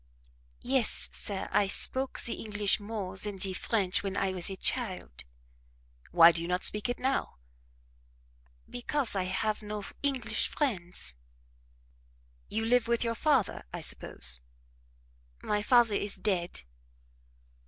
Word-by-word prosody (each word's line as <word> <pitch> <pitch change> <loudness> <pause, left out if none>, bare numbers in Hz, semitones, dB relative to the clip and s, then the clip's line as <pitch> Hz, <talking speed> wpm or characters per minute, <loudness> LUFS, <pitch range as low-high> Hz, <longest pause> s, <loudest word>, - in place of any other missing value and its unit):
"Yes, 255 -2 -1
sir, 195 -2 -5
I 205 -1 +3
spoke 260 +6 +2
the 235 - 0
English 210 -2 +1
more 205 -3 -5
than 205 +1 0
the 190 0 +1
French 190 -1 0
when 195 -1 -4
I 195 -1 0
was 180 0 0
a 195 - -5
child." 190 - -1 0.8
"Why 170 0 +8
do 165 - -3
you 170 - -4
not 180 +1 -1
speak 210 +3 +1
it 245 - -2
now?" 265 - -2 1.3
"Because 245 -1 -2
I 185 -1 0
have 200 +4 -1
no 210 -1 -6 0.2
English 255 -6 +1
friends." 180 - -2 1.4
"You 225 +1 -2
live 245 0 +2
with 235 0 +1
your 230 -1 -1
father, 270 - +1
I - - -6
suppose?" 60 -1 +2 1.0
"My 210 0 0
father 235 0 +4
is 200 0 0
dead." 180 - -2
210 Hz, 130 wpm, -29 LUFS, 185-235 Hz, 1.4 s, Why